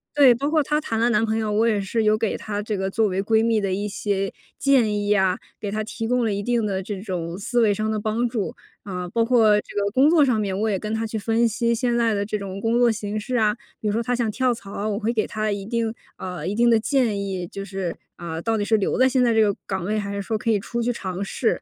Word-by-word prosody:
对， 275 -4 +7
包 280 +4 -1
括 310 -1 +3
她 300 +2 0
谈 225 -6 -2
了 235 +1 +3
男 215 +1 +3
朋 220 0 0
友， 220 -1 -1
我 215 +2 +2
也 210 -3 +2
是 215 +3 -1
有 215 0 +3
给 220 -1 -1
她 205 -1 -4
这 215 0 -3
个 190 0 -1
作 220 +2 +2
为 195 0 -1
闺 220 +1 +3
蜜 225 -2 +2
的 195 - -1
一 205 +2 -2
些 195 -1 -2 0.2
建 255 -6 +3
议 205 0 +1
啊， 190 -2 +2 0.2
给 205 - -3
她 215 +1 -1
提 225 +1 -5
供 250 -1 +2
了 215 - 0
一 200 0 -3
定 240 -1 +1
的 190 -2 -2
这 195 0 -5
种 180 -4 -4
思 240 +4 0
维 210 -2 +4
上 215 +2 -2
的 220 - 0
帮 220 +3 0
助。 230 -4 -3 0.3
啊， 180 -2 -5
包 230 +6 +1
括 225 -3 +4
这 - - -14
个 200 - +1
工 275 +4 +5
作 320 -4 +5
上 250 -5 +2
面， 195 -2 -2
我 220 - +1
也 200 - +1
跟 215 +3 -4
她 225 0 -1
去 220 0 -4
分 225 +2 +2
析 235 +2 0
现 240 0 0
在 230 -2 +2
的 200 0 -1
这 210 +1 -2
种 195 -1 -6
工 225 +2 +1
作 240 -1 +5
形 210 0 -4
势 245 +4 -2
啊， 210 -1 +2 0.2
比 215 - -3
如 205 - +1
说 230 +1 0
她 245 - -1
想 235 -2 0
跳 250 +3 +1
槽 200 -3 -10
啊， 210 +2 -2
我 205 0 -1
会 230 +2 0
给 220 -2 +1
她 215 0 -2
一 200 -1 -3
定 230 0 -1 0.2
呃， 180 -1 -6
一 195 - -1
定 235 +1 +4
的 230 - +5
建 235 -4 +1
议， 185 -3 -4
就 195 - -7
是， 190 -3 -4 0.2
呃， 165 -1 -5
到 225 +3 0
底 205 - -1
是 220 - +3
留 205 -3 0
在 260 - +5
现 260 -1 +2
在 235 - +3
这 225 - +4
个 205 -2 +3
岗 190 -3 -3
位， 215 +2 0
还 200 -1 -3
是 200 - -3
说 220 +2 -2
可 230 - -3
以 210 - +2
出 235 +4 -4
去 245 +1 +1
尝 190 -4 -4
试。 225 +4 -1
215 Hz, 310 characters per minute, -23 LUFS, 200-230 Hz, 0.3 s, 对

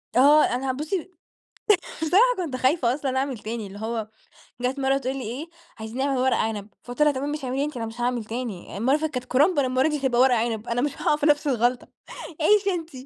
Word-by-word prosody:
آه 290 +5 +6
أنا 260 +2 0
بصي 315 +7 -4 0.9
بصراحة 355 +7 +5
كنت 320 -8 -3
خايفة 255 -1 +2
أصلًا 270 -2 -2
أعمل 265 -3 -2
تاني 220 0 -5
اللي 200 +1 -10
هو 220 0 -3 0.5
جات 255 +3 -1
مرة 270 0 +2
تقول 265 0 -3
لي 270 - -4
إيه: 255 +9 -5 0.3
"عايزين 220 +2 -7
نعمل 270 0 0
ورق 260 -1 +2
عنب." 215 -2 -2 0.2
فقُلت 245 +4 -6
لها: 300 - +6
"تمام 280 +1 -3
ماشي 295 -2 -4
اعمليه 270 +3 -1
أنتِ، 300 -4 -6
أنا 225 - -3
مش 225 +2 -8
هاعمل 240 -2 -1
تاني، 220 -5 -6
المرّة 260 +7 +2
اللي - - -1
فاتت 315 -2 -2
كانت 250 - -5
كُرنب 295 +5 +4
المرة 260 +2 +2
دي 300 - 0
هتبقى 250 -3 +2
ورق 255 -1 +5
عنب، 225 0 -2
أنا 235 +1 0
مش 290 0 -3
هاقع - - +3
في 295 - -2
نفس 295 0 +3
الغلطة 245 -1 +1 0.5
عيشي 410 +3 +4
أنتِ" 330 -2 -5
260 Hz, 220 wpm, -24 LUFS, 240-295 Hz, 0.9 s, آه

